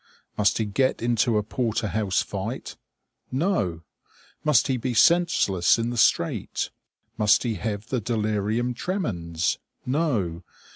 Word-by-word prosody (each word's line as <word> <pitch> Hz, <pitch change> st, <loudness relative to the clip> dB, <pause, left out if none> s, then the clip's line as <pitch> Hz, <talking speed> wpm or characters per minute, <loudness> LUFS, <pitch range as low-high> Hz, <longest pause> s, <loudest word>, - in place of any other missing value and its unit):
Must 105 Hz, -1 st, +2 dB
he 110 Hz, -, 0 dB
get 115 Hz, +5 st, 0 dB
into 120 Hz, -1 st, +2 dB
a 105 Hz, -, +1 dB
porter 115 Hz, -1 st, -1 dB
house 105 Hz, -3 st, 0 dB
fight? -, -, -5 dB, 0.6 s
No! 130 Hz, -, 0 dB, 0.6 s
Must 150 Hz, -5 st, +4 dB
he 130 Hz, -, 0 dB
be 125 Hz, 0 st, -3 dB
senseless 125 Hz, -, +4 dB
in 115 Hz, +1 st, -1 dB
the -, -, -4 dB
street? 115 Hz, -, +1 dB, 0.5 s
Must 105 Hz, -1 st, +4 dB
he 120 Hz, -3 st, -1 dB
have 105 Hz, +2 st, -4 dB
the 125 Hz, -3 st, -1 dB
delirium 110 Hz, +2 st, -1 dB
tremens? 95 Hz, -, -2 dB, 0.3 s
No! 125 Hz, -, 0 dB
110 Hz, 130 wpm, -25 LUFS, 105-125 Hz, 0.6 s, Must